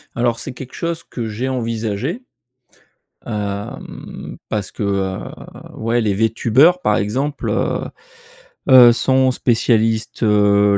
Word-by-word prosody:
Alors 120 -1 +1
c'est - - -6
quelque 130 0 -10
chose 170 0 -3
que 115 -3 -6
j'ai 120 +5 -3
envisagé, 115 - -3 1.0
hem, 105 -2 -6
parce 105 -3 -3
que, - - -9
heu, 95 -1 -1 0.6
ouais, 115 +2 0
les 105 -3 0
Vtubers 115 - +3
par 105 - +2
exemple, 135 +8 -2
heu - - 0 0.9
heu, 125 -2 +9
sont 130 +1 +2
spécialistes, 115 -2 +1
heu, 105 -1 +4
115 Hz, 115 wpm, -19 LUFS, 105-130 Hz, 1.0 s, heu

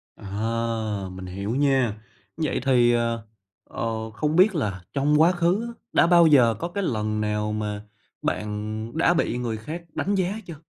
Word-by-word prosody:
À, 110 -1 -3
mình 95 0 -8
hiểu 100 +6 -4
nha. 130 -6 +1 0.4
Vậy 155 -4 -1
thì, 120 -3 +4
ờ, 115 -1 -1 0.4
ờ, 110 -1 -4
không 150 +7 -1
biết 190 +1 +5
là 100 - -2
trong 150 +2 +3
quá 170 +3 +6
khứ 180 +5 +1
á, 235 - -7 0.2
đã 170 - +5
bao 170 -1 +6
giờ 125 -7 +5
có 170 - -2
cái 200 +3 -3
lần 110 - -1
nào 105 0 -1
mà 105 -1 -3 0.4
bạn 110 +2 -3
đã 170 +1 +4
bị 165 -7 0
người 115 -3 -2
khác 155 +11 -6
đánh 200 +2 0
giá 190 +1 0
chưa? 170 -3 -8
115 Hz, 175 wpm, -24 LUFS, 105-160 Hz, 0.4 s, quá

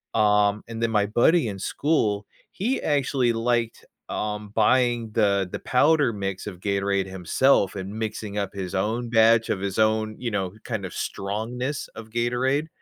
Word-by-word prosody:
Um, 105 -1 +3
and 115 0 -6
then 115 - +1
my 105 -2 +2
buddy 120 +7 +3
in 100 -1 -6
school, 105 -3 0 0.3
he 245 +8 -1
actually 135 -4 +1
liked, 115 0 -1 0.2
um, 105 0 -3
buying 120 0 +2
the 100 -3 +2
the - - -4
powder 145 -1 +3
mix 100 -1 -4
of 95 -4 -7
Gatorade 100 0 0
himself 95 +4 +2
and 95 +1 -5
mixing 105 -2 -4
up 100 -2 -2
his 95 -3 -5
own 115 +5 -1
batch 115 0 +4
of - - 0
his 100 -1 -3
own, 110 0 +2
you 120 -2 -3
know, 95 -3 -2
kind 110 -5 -4
of 90 - -7
strongness 120 +8 -3
of 115 -1 -9
Gatorade, 125 +5 0
110 Hz, 165 wpm, -24 LUFS, 100-120 Hz, 0.3 s, batch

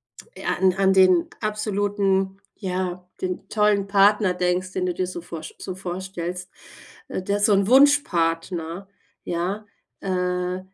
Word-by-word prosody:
an 190 - -1
an 195 +1 +3
den 185 -3 +5
absoluten, 200 -2 0
ja, 180 -2 -3
den 185 -1 -3
tollen 210 -2 +2
Partner 200 -1 +4
denkst, 180 +1 -1
den 185 - -1
du 180 - 0
dir 185 +1 -2
so 180 -1 -6
vorsch 165 -2 -8
so 185 - -6
vorstellst, 180 -1 -5 0.6
äh, - - -3
der 200 +2 -1
so 205 0 +4
'n 195 0 +3
Wunschpartner 180 - +2 0.4
ja, 185 +5 -3 0.4
äh, 180 -1 -1
185 Hz, 130 wpm, -23 LUFS, 180-200 Hz, 0.6 s, den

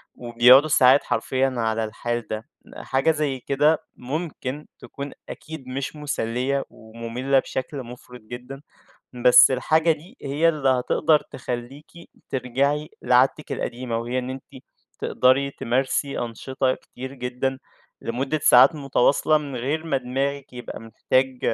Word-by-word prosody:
وبيقعدوا 125 +4 +5
ساعات 135 -1 +5
حرفيًا 130 +3 0
على 110 -1 0
الحال 120 +2 -4
ده. 110 +6 -6 0.3
حاجة 135 +4 +1
زَي 150 -4 -2
كده 145 +4 +2 0.2
ممكن 145 0 -5
تكُون 140 -1 -8 0.2
أكيد 155 -3 -9
مش 135 +3 -4
مسلّية 135 -2 -2
ومملة 115 +4 -2
بشكل 130 +1 -5
مفرط 125 +1 -12
جدًا، 125 +5 -9 0.6
بس 125 - +8
الحاجة 155 +5 +2
دي 175 - -7
هي 145 +4 +2
اللي 150 -4 0
هتقدَر 130 +4 +2
تخلّيكِ 125 +3 -6 0.4
ترجَعي 140 +4 -1
لعادتِك 130 +4 +2
القديمة، 120 -1 -3
وهي 120 +2 -2
إن 125 0 -5
أنتِ 130 0 -10 0.4
تقدَري 135 +2 +2
تمارسي 130 +3 -1
أنشطة 130 +3 -2
كتير 130 +2 -10
جدًا 130 +1 -3 0.4
لمدة 135 +6 -2
ساعات 130 +6 +7
متواصلة 140 +2 +2
من 145 -3 -6
غِير 145 +7 -2
ما 140 -4 +1
دماغِك 135 +2 -3
يبقى 125 -1 -8
محتاج 130 +3 -1
130 Hz, 125 wpm, -23 LUFS, 125-140 Hz, 0.6 s, بس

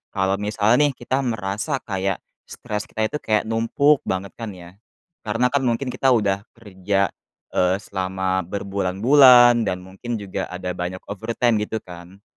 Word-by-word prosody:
Kalau 95 0 +1
misalnya 110 +7 +2
nih 140 - -2
kita 130 +2 -2
merasa 115 +2 -2
kayak 95 -2 -2 0.2
stres 105 -1 -5
kita 110 - -3
itu 150 - -3
kayak 110 -5 +1
numpuk 115 +6 +2
banget 95 0 -2
kan 110 -4 -6
ya? 90 +3 -14 0.4
Karena 115 +3 0
kan 135 -3 +1
mungkin 125 +2 -1
kita 130 -2 +3
udah 100 -2 0
kerja, 100 -3 -1 0.4
eee, 90 0 +2
selama 95 -1 -2
berbulan-bulan 115 +6 +5
dan 90 0 -2
mungkin 95 +6 -6
juga 100 -3 -4
ada 90 0 -5
banyak 90 +1 -5
over 110 +3 -5
time 120 -3 +2
gitu 110 +1 -4
kan? 90 +3 -13
105 Hz, 155 wpm, -22 LUFS, 95-120 Hz, 0.4 s, berbulan-bulan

